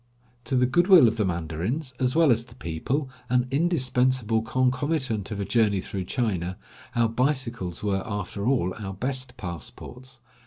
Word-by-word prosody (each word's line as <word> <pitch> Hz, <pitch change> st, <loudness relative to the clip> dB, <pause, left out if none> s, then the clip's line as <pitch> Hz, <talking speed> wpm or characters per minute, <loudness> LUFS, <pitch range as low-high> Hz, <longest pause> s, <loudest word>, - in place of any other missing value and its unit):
To 135 Hz, -, 0 dB
the 125 Hz, 0 st, +4 dB
good 175 Hz, +8 st, +2 dB
will 180 Hz, -11 st, +8 dB
of 115 Hz, +1 st, 0 dB
the 105 Hz, -, +1 dB
mandarins, 90 Hz, -, -2 dB
as 130 Hz, +1 st, +1 dB
well 165 Hz, -4 st, +5 dB
as 115 Hz, 0 st, +2 dB
the 115 Hz, -, -15 dB
people, 125 Hz, -, -2 dB, 0.2 s
an 125 Hz, 0 st, +2 dB
indispensable 130 Hz, -7 st, +2 dB
concomitant 130 Hz, -1 st, 0 dB
of 105 Hz, -2 st, -4 dB
a 100 Hz, -, -1 dB
journey 105 Hz, -4 st, +2 dB
through 95 Hz, 0 st, -4 dB
China, 95 Hz, -6 st, -1 dB, 0.4 s
our 120 Hz, -1 st, +3 dB
bicycles 115 Hz, -, -1 dB
were 100 Hz, -2 st, 0 dB
after 100 Hz, 0 st, -4 dB
all 115 Hz, -9 st, +1 dB
our 95 Hz, -3 st, -5 dB
best 130 Hz, +4 st, -3 dB
passports. 120 Hz, -, -8 dB
120 Hz, 160 wpm, -26 LUFS, 100-130 Hz, 0.4 s, will